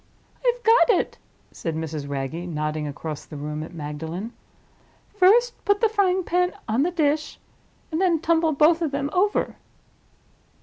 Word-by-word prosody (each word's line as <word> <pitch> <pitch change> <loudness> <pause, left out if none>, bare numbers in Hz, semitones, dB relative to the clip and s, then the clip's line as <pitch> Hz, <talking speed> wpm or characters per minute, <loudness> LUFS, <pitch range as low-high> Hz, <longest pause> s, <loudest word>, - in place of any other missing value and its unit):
"I've - - +1
got 455 +2 +5
it," - - -4 0.3
said 165 -2 -4
Mrs. 155 -3 -4
Wragge, 135 0 -3 0.2
nodding 155 -1 -2
across 150 +1 -6
the 150 - -10
room 150 +1 -4
at 160 - -7
Magdalen. 165 +7 -6 0.8
"First 430 +5 +4
put 405 -1 +2
the 450 - +3
frying 380 -3 +2
pan 360 +1 +1
on 225 +3 +1
the 330 - +2
dish, 305 -3 0 0.5
and 320 +3 -1
then 355 -3 +3
tumble 325 0 +2
both 315 +3 +4
of 325 - +1
them 280 +1 -2
over." 400 +3 +1
300 Hz, 150 wpm, -24 LUFS, -, 0.8 s, got